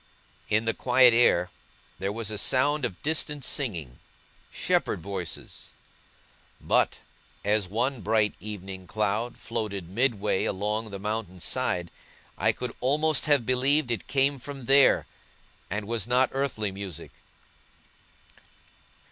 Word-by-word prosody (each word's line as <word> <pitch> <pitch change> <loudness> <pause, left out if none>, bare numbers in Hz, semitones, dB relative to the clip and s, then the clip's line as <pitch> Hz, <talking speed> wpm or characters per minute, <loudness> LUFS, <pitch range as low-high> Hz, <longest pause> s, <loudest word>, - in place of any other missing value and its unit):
In 110 +1 +2
the 115 - +1
quiet 125 -1 +5
air, 90 -7 +3 0.5
there 95 +1 -1
was 110 0 -3
a 105 - -3
sound 140 +4 +2
of 95 -7 -6
distant 150 -2 0
singing 85 - -1 0.5
shepherd - - 0
voices; 95 0 -6 0.9
but, - - +1 0.4
as 105 -1 +2
one 120 +5 -1
bright 105 0 +2
evening 95 -3 -7
cloud 110 +5 -1
floated 105 -6 -4
midway 105 -2 +1
along 105 +3 -2
the 100 - -6
mountain's 100 -4 -4
side, 85 -1 -1 0.4
I - - +2
could 125 -2 -5
almost 150 +3 +2
have 145 -5 +3
believed 130 +2 +3
it 115 - -3
came 135 0 +2
from 135 0 -8
there, 135 +2 +5 0.6
and 105 +1 -3
was 115 -3 -1
not 125 +2 +3
earthly 130 -7 -1
music. 95 -4 -7
110 Hz, 120 wpm, -27 LUFS, 100-130 Hz, 0.9 s, quiet